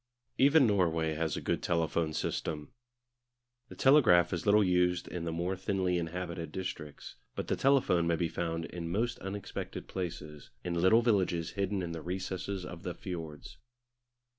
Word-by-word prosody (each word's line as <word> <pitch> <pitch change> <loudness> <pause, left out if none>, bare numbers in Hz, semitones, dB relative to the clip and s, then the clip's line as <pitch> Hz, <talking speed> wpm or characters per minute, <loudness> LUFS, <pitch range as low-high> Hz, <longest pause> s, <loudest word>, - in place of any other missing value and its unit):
Even 140 +1 +6
Norway 80 -7 +2
has 80 -1 -1
a - - -4
good - - -1
telephone 85 -1 0
system. 75 -1 -3 1.0
The - - -10
telegraph 115 - +5
is 85 +3 -3
little 105 +1 +6
used 90 -1 +2
in 85 -2 -5
the 85 - -2
more 85 +3 -1
thinly 95 -1 0
inhabited 85 -1 -4
districts, 75 -5 -6 0.2
but - - -4
the - - +2
telephone 130 -11 +3
may 85 - +3
be 85 0 0
found 80 0 -3
in 85 -1 -6
most 115 +7 -1
unexpected 95 +1 -6
places, 80 -5 -6
in 90 - -2
little 95 +7 +4
villages 95 -7 +1
hidden 100 -1 -1
in 85 - -4
the 85 -1 -5
recesses 95 +1 -4
of 90 -2 -8
the 90 -1 -5
fiords. 80 -5 -7
90 Hz, 160 wpm, -31 LUFS, 85-95 Hz, 1.0 s, Even